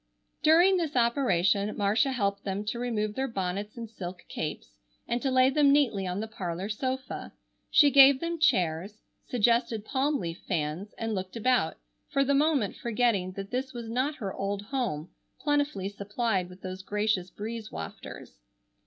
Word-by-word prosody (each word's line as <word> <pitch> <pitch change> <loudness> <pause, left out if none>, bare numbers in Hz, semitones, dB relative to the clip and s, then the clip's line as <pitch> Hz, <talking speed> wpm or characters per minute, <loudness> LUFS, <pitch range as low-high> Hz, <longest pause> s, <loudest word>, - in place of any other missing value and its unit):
During 345 +5 +6
this 320 -5 -2
operation 210 -5 +2
Marcia 215 +6 +2
helped 200 -5 -1
them 195 +1 -2
to 230 +3 -3
remove 215 -4 -1
their 265 +4 -1
bonnets 200 0 -3
and 230 -1 -5
silk 185 -4 -8
capes - - -5 0.3
and 240 +1 -1
to 270 - 0
lay 260 0 +4
them 285 0 +4
neatly 235 -10 +2
on 180 +2 -2
the 220 - -4
parlor 185 -2 -4
sofa. 260 +4 -4 0.4
She 290 -2 +6
gave 275 -1 +8
them 335 +1 -3
chairs, 185 - +1 0.2
suggested 235 -2 +1
palm 280 +4 +1
leaf 170 0 -5
fans, 165 +4 -2
and 225 -1 -2
looked 185 0 -4
about, 235 -6 +1 0.3
for 275 - +2
the 280 +1 +1
moment 280 -7 +2
forgetting 225 -6 0
that 195 +1 -7
this 260 +1 -2
was 230 -2 -6
not 260 +5 0
her 200 -9 -5
old 200 +1 -3
home 215 - -3 0.3
plentifully 290 -10 0
supplied 200 -2 -2
with 180 +1 -14
those 185 0 -5
gracious 205 -2 -1
breeze 220 +2 -6
wafters. - - -8
220 Hz, 160 wpm, -28 LUFS, 195-265 Hz, 0.4 s, gave